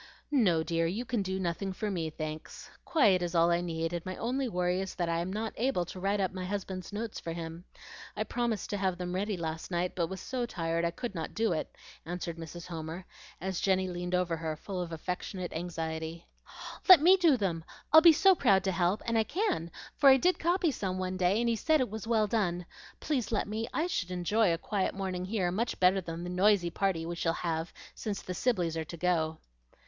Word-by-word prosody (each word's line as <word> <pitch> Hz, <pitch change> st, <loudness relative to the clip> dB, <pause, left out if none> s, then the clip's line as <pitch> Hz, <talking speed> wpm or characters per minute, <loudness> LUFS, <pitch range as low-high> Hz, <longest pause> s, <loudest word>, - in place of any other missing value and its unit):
"No, 190 Hz, -, +3 dB
dear, 165 Hz, 0 st, 0 dB
you 210 Hz, +9 st, -3 dB
can 240 Hz, -3 st, 0 dB
do 190 Hz, 0 st, -2 dB
nothing 190 Hz, +2 st, -2 dB
for 210 Hz, +2 st, -3 dB
me, 165 Hz, -4 st, -2 dB
thanks. 155 Hz, 0 st, -7 dB
Quiet 210 Hz, -, +4 dB
is 175 Hz, 0 st, -2 dB
all 170 Hz, +1 st, +5 dB
I 170 Hz, 0 st, +2 dB
need, 165 Hz, -1 st, -2 dB
and 170 Hz, -1 st, -3 dB
my 185 Hz, 0 st, -5 dB
only 255 Hz, +2 st, -1 dB
worry 180 Hz, -1 st, 0 dB
is 190 Hz, -, -5 dB
that 175 Hz, -2 st, -1 dB
I 165 Hz, 0 st, +1 dB
am 175 Hz, +2 st, -3 dB
not 220 Hz, +2 st, -3 dB
able 230 Hz, -7 st, +1 dB
to 185 Hz, -, -8 dB
write 200 Hz, +2 st, 0 dB
up 190 Hz, -1 st, 0 dB
my 185 Hz, -1 st, -4 dB
husband's 190 Hz, -1 st, -4 dB
notes 215 Hz, +2 st, -4 dB
for 165 Hz, -, -5 dB
him. 165 Hz, +1 st, -7 dB, 0.5 s
I -, -, +1 dB
promised 235 Hz, -4 st, -2 dB
to 205 Hz, -, -1 dB
have 190 Hz, -2 st, 0 dB
them 180 Hz, -1 st, -4 dB
ready 200 Hz, +1 st, -1 dB
last 160 Hz, -1 st, -4 dB
night, 180 Hz, 0 st, -1 dB
but 170 Hz, -2 st, 0 dB
was 190 Hz, +2 st, -6 dB
so 250 Hz, -2 st, -3 dB
tired 165 Hz, -3 st, -1 dB
I -, -, +2 dB
could 235 Hz, +6 st, -5 dB
not 165 Hz, -3 st, -5 dB
do 225 Hz, -2 st, +1 dB
it," 155 Hz, -, -4 dB, 0.3 s
answered 170 Hz, 0 st, -5 dB
Mrs. 165 Hz, +1 st, -8 dB
Homer, 165 Hz, +1 st, -6 dB, 0.3 s
as 190 Hz, -1 st, -3 dB
Jenny 190 Hz, -1 st, +2 dB
leaned 180 Hz, 0 st, -2 dB
over 175 Hz, -2 st, 0 dB
her 160 Hz, -1 st, -3 dB
full 185 Hz, +3 st, -5 dB
of 170 Hz, -1 st, -5 dB
affectionate 180 Hz, +2 st, -4 dB
anxiety. 160 Hz, -1 st, -4 dB, 0.6 s
"Let 370 Hz, -, +12 dB
me 355 Hz, +6 st, +7 dB
do 335 Hz, -8 st, +4 dB
them! 175 Hz, -7 st, -1 dB, 0.3 s
I'd 315 Hz, -, +11 dB
be 335 Hz, 0 st, +9 dB
so 380 Hz, +5 st, +6 dB
proud 200 Hz, -, +3 dB
to 190 Hz, -, +1 dB
help; 180 Hz, +3 st, +1 dB
and 230 Hz, -1 st, +2 dB
I -, -, +4 dB
can, 280 Hz, -, -1 dB, 0.3 s
for 275 Hz, -, +7 dB
I 265 Hz, -, +8 dB
did 360 Hz, +7 st, +2 dB
copy 345 Hz, -1 st, +2 dB
some 190 Hz, -7 st, -3 dB
one 185 Hz, 0 st, -2 dB
day, 185 Hz, +3 st, +2 dB
and 235 Hz, -, +1 dB
he 230 Hz, -, +2 dB
said 310 Hz, +7 st, +2 dB
it 255 Hz, -6 st, 0 dB
was 220 Hz, 0 st, -6 dB
well 225 Hz, -2 st, +3 dB
done. 185 Hz, -5 st, 0 dB, 0.4 s
Please 260 Hz, -8 st, -1 dB
let 215 Hz, -, 0 dB
me; 220 Hz, +2 st, -3 dB
I 315 Hz, -, 0 dB
should 195 Hz, -, -2 dB
enjoy 180 Hz, +3 st, +2 dB
a 165 Hz, -, +1 dB
quiet 195 Hz, +3 st, -1 dB
morning 185 Hz, -2 st, -3 dB
here 190 Hz, -3 st, 0 dB
much 230 Hz, +6 st, -2 dB
better 185 Hz, +1 st, +4 dB
than 165 Hz, -1 st, -6 dB
the 175 Hz, -, -4 dB
noisy 185 Hz, -1 st, +3 dB
party 185 Hz, -4 st, 0 dB
we 170 Hz, -, -3 dB
shall 165 Hz, -1 st, 0 dB
have, 165 Hz, -1 st, -2 dB, 0.2 s
since 205 Hz, -3 st, -4 dB
the 180 Hz, -, -4 dB
Sibleys 180 Hz, -7 st, 0 dB
are 160 Hz, -1 st, -2 dB
to 170 Hz, -, -8 dB
go." 160 Hz, -2 st, +1 dB
185 Hz, 225 wpm, -30 LUFS, 170-215 Hz, 0.6 s, Let